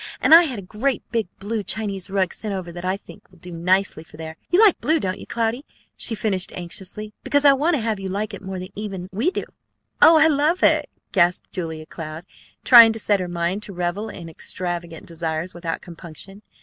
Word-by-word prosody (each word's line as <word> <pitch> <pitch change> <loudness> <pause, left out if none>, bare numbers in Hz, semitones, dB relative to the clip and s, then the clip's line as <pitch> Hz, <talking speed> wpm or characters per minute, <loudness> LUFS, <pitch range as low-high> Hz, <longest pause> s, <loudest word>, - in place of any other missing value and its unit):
And - - +4
I 340 +1 +10
had 260 -7 -2
a 200 - -7
great 235 +8 -2
big 225 -4 0
blue 210 +3 -3
Chinese 200 -2 -3
rug 190 -2 0
sent 210 -3 -4
over 180 -2 -5
that 175 +1 -8
I 185 +1 0
think 205 0 -16
will 185 - -21
do 180 +2 -11
nicely 180 0 0
for 155 - -16
there. 160 0 -7
You 355 - +3
like 430 -4 +5
blue, 315 +2 +2
don't 185 -5 -3
you, - - -10
Cloudy?" 235 +3 -1 0.3
she 225 - +1
finished 200 -4 -1
anxiously. 190 +4 -8
"Because 285 0 +2
I 280 - +8
want 310 +5 +2
to 270 - -1
have 220 -3 -1
you 195 -1 -5
like 205 +3 -3
it - - -7
more 190 -1 -6 0.2
even 200 -3 -5
than 180 - -9
we 225 - +1
do." - - -3 0.6
"Oh, 325 0 +8
I 310 - +6
love 310 +3 +2
it!" - - +4 0.2
gasped 175 -2 +1
Julia 160 -3 -5
Cloud, 155 +1 -8 0.4
trying 235 -3 +9
to 225 - -6
set 205 -2 +2
her 180 - -3
mind 175 +3 -2
to 205 - -7
revel 180 +5 -3
in 170 -5 -9
extravagant 170 0 -5
desires 165 +1 -4
without 170 -1 -4
compunction. 175 +3 -10
195 Hz, 215 wpm, -22 LUFS, 175-225 Hz, 0.6 s, I